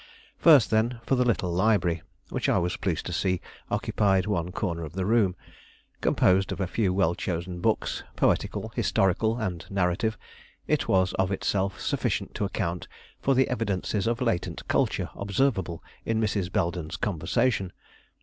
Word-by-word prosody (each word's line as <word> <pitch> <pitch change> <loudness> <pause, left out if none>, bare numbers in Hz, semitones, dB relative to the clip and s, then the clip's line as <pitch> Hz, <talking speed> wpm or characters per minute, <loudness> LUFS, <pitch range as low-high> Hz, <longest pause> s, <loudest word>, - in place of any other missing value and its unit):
First 150 -9 +6
then, 115 +2 +1
for - - 0
the 125 -1 +4
little 95 -7 0
library, 90 -3 +2 0.3
which - - -1
I - - +3
was 90 +1 0
pleased 85 -5 -2
to 90 - -4
see 90 +1 +1 0.3
occupied 95 -3 +1
one 90 -4 -1
corner 85 -4 -2
of 80 -1 -7
the 95 0 -2
room. 105 -4 +3 0.7
Composed 95 +1 +3
of - - -4
a 95 - +1
few 95 +1 0
well 90 -3 +2
chosen 90 0 -4
books, - - 0
poetical, - - +1
historical, 110 +4 +2
and 95 -8 -3
narrative, 100 +4 0 0.5
it - - 0
was 95 -1 +3
of 95 0 +2
itself 95 0 -1
sufficient - - -1
to 105 - -1
account 90 -3 -3 0.3
for 135 - +2
the 130 +1 +4
evidences 105 -3 -1
of 120 +2 0
latent 115 -8 -1
culture - - 0
observable 100 -4 0 0.2
in 115 -1 0
Mrs. 100 -4 0
Belden's 85 -5 -1
conversation. 100 +2 0
95 Hz, 155 wpm, -27 LUFS, 90-110 Hz, 0.7 s, First